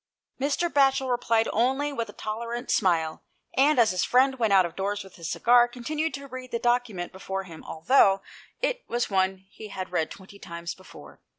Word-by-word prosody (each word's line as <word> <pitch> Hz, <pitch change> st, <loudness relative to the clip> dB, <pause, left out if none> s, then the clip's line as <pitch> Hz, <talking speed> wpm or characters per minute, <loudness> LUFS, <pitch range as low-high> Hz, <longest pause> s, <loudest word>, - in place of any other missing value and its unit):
Mr. 285 Hz, +5 st, +1 dB
Batchel 270 Hz, -4 st, +2 dB
replied 230 Hz, -2 st, +2 dB
only 265 Hz, +6 st, +1 dB
with 230 Hz, -5 st, -3 dB
a -, -, -10 dB
tolerant 235 Hz, +3 st, -4 dB
smile, 165 Hz, -5 st, +1 dB, 0.3 s
and, 285 Hz, +2 st, +4 dB
as 230 Hz, -4 st, +5 dB
his 185 Hz, -1 st, 0 dB
friend 265 Hz, +1 st, +3 dB
went 225 Hz, -3 st, +2 dB
out 190 Hz, -2 st, +6 dB
of 170 Hz, -, -7 dB
doors 200 Hz, +1 st, -2 dB
with 190 Hz, -, -15 dB
his 165 Hz, -2 st, -6 dB
cigar, 240 Hz, 0 st, +5 dB
continued 300 Hz, +7 st, -3 dB
to 280 Hz, 0 st, -8 dB
read 255 Hz, -1 st, -8 dB
the 235 Hz, -, -1 dB
document 240 Hz, -7 st, 0 dB
before 190 Hz, 0 st, -5 dB
him, 165 Hz, -4 st, -11 dB
although 195 Hz, +2 st, +3 dB, 0.4 s
it -, -, 0 dB
was 240 Hz, -2 st, -1 dB
one 190 Hz, 0 st, 0 dB
he 215 Hz, -, -10 dB
had 185 Hz, -3 st, -6 dB
read 160 Hz, -3 st, 0 dB
twenty 200 Hz, +1 st, -13 dB
times 170 Hz, -1 st, -6 dB
before. 75 Hz, -, -15 dB
225 Hz, 190 wpm, -26 LUFS, 190-255 Hz, 0.4 s, out